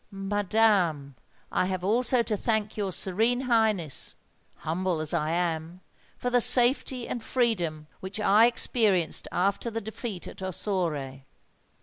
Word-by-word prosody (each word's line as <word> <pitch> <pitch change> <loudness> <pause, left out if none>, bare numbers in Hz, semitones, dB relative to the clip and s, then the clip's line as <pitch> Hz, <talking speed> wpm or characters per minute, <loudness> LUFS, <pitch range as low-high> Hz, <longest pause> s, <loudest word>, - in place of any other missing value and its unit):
Oh! - - -13
madam, 195 -7 +1 0.4
I 185 - 0
also 225 +8 +1
have 235 - +2
to 215 - -1
thank 215 0 -1
your 200 -3 -2
Serene 215 +7 0
Highness—humble 185 - -1
as 155 +1 -2
I 155 -2 0
am—for 170 +7 -4
the 245 0 +4
safety 250 0 +3
and 240 - -4
freedom 180 -12 -1
which 190 +3 -6
I 210 +2 +5
experienced 210 -8 +1
after 200 +5 0
the 225 0 -4
defeat 215 -2 -6
at - - -10
Ossore." 165 -8 -3
195 Hz, 125 wpm, -27 LUFS, 175-225 Hz, 0.4 s, I